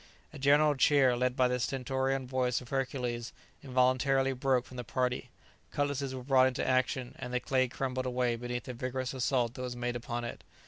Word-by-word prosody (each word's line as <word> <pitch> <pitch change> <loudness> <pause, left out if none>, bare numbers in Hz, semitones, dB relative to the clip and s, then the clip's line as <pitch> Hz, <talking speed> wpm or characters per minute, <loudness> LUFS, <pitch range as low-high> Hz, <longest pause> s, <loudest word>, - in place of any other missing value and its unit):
A 150 - -9
general 145 +2 +5
cheer, 135 -2 +4
led 125 +1 0
by 130 -1 +4
the 125 0 -1
stentorian 130 +1 -1
voice 125 -1 0
of 125 - -12
Hercules, 125 -3 -2 0.3
involuntarily 135 +1 +2
broke 130 -1 +1
from 125 - -11
the 125 - -4
party; 125 +2 -1 0.4
cutlasses 140 -2 -1
were 130 - -6
brought 130 -1 +5
into 130 - -2
action, 130 0 0
and 125 -1 -5
the 125 - +1
clay 130 0 +1
crumbled 130 0 -3
away 125 -1 +1
beneath 120 +1 -4
the 125 - -6
vigorous 130 +1 -3
assault 125 -2 0
that 130 - -7
was 125 -1 -4
made 120 0 -2
upon 120 0 -4
it. 120 - -6
130 Hz, 190 wpm, -31 LUFS, 125-135 Hz, 0.4 s, general